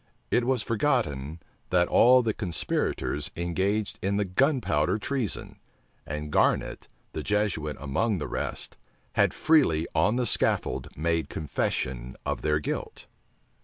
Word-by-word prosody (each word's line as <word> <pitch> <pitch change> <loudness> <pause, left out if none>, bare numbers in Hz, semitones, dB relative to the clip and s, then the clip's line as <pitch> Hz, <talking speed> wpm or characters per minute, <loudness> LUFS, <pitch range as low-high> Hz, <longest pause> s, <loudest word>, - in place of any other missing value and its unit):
It 120 - +3
was 125 -3 +1
forgotten, 85 - 0 0.3
that 90 -1 +3
all 125 +1 +6
the 110 -2 0
conspirators 85 -6 -2
engaged 95 +5 -1
in 100 +1 0
the 105 - +1
gunpowder 95 - +1
treason, 125 0 -3 0.5
and 75 0 -4
Garnet, - - +1 0.3
the 80 - -3
Jesuit 95 -6 -1
among 95 - 0
the 75 -4 -4
rest, - - -4 0.4
had - - +3
freely 130 - +3
on 85 +8 +3
the 125 0 +1
scaffold - - 0
made 80 +1 0
confession 65 -4 -2
of - - -2
their 75 0 +2
guilt. 75 - -5
90 Hz, 130 wpm, -27 LUFS, 75-115 Hz, 0.5 s, all